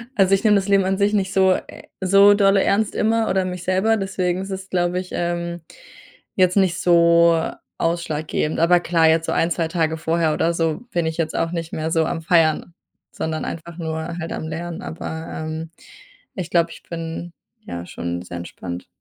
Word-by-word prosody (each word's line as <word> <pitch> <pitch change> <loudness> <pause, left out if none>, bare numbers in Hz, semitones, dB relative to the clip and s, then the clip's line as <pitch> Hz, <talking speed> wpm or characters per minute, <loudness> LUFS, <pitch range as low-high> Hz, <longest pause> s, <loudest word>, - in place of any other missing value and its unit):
Also, 195 -3 +4
ich 195 - +2
nehme 215 -2 +5
das 195 -1 +1
Leben 195 -1 +4
an 190 0 0
sich 205 +1 +2
nicht 195 -2 0
so 190 -1 +4
e - - -9
so 195 +2 +6
dolle 195 -1 +4
ernst 210 +1 +1
immer 225 +1 +1
oder 190 0 +2
mich 180 -1 -5
selber. 190 +5 +2
Deswegen 185 -2 -1
ist 195 - -6
es, 190 0 -6
glaube 175 0 0
ich, 185 - -7
ähm, 170 0 -2 0.7
jetzt 185 -1 +3
nicht 185 -3 +3
so 170 -1 +5 0.4
ausschlaggebend. 160 -2 -1
Aber 175 +2 +5
klar, 165 -2 +2
jetzt 160 0 +2
so - - -2
1, 165 - +1
2 165 -1 0
Tage 160 -1 0
vorher 160 0 +1
oder 170 +2 +1
so 165 +2 -1
bin 170 -4 0
ich 160 - -3
jetzt 160 -2 -2
auch 165 - 0
nicht 165 -2 -5
mehr 155 0 -2
so 160 -1 +2
am 165 - -3
feiern, 165 0 +2 0.4
sondern 160 -1 -3
einfach 165 +1 -7
nur 160 0 -4
halt 165 -1 -5
am 160 - -4
Lernen, 165 +2 -5
aber, 160 0 -6
ähm, 160 +1 -5 0.7
ich 180 -2 -4
glaube, 170 -1 +2
ich - - -12
bin, 165 +1 -6 0.3
ja, 85 0 -6
schon 85 0 -5
sehr 90 -1 -8
entspannt. 85 0 -7
170 Hz, 195 wpm, -21 LUFS, 160-190 Hz, 0.7 s, so